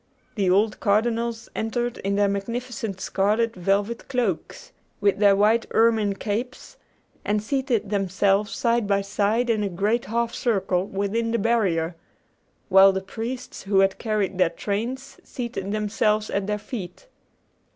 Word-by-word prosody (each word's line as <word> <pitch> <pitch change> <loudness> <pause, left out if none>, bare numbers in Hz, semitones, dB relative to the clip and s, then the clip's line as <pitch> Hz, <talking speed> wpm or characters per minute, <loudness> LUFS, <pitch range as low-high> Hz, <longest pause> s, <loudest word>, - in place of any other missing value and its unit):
The 195 -4 0
old 210 +4 +2
cardinals 230 +2 0
entered 240 +2 -2
in 200 +1 -1
their 205 0 +3
magnificent 225 +1 -4
scarlet 215 +5 0
velvet 200 +5 -1
cloaks, 240 -10 -3 0.3
with 200 -1 +2
their 200 -1 +6
white 215 +3 +3
ermine 225 -3 +3
capes, 230 +6 -4 0.5
and 210 +1 +1
seated 235 -4 -1
themselves 195 +1 +1
side 235 -2 +1
by 200 -1 +2
side 210 +4 0
in 225 -3 +1
a 205 - -1
great 205 +6 0
half 235 +2 -1
circle 195 -5 0
within 205 +4 -1
the 230 - +1
barrier, 190 -7 +1 0.7
while 195 0 +7
the 190 0 -2
priests 230 +6 -6
who 195 0 +2
had 195 0 +1
carried 205 -4 -1
their 180 - +4
trains 235 +9 -4
seated 235 -6 -5
themselves 215 0 0
at 200 0 -1
their 210 0 0
feet. 210 - -8
210 Hz, 140 wpm, -24 LUFS, 195-230 Hz, 0.7 s, while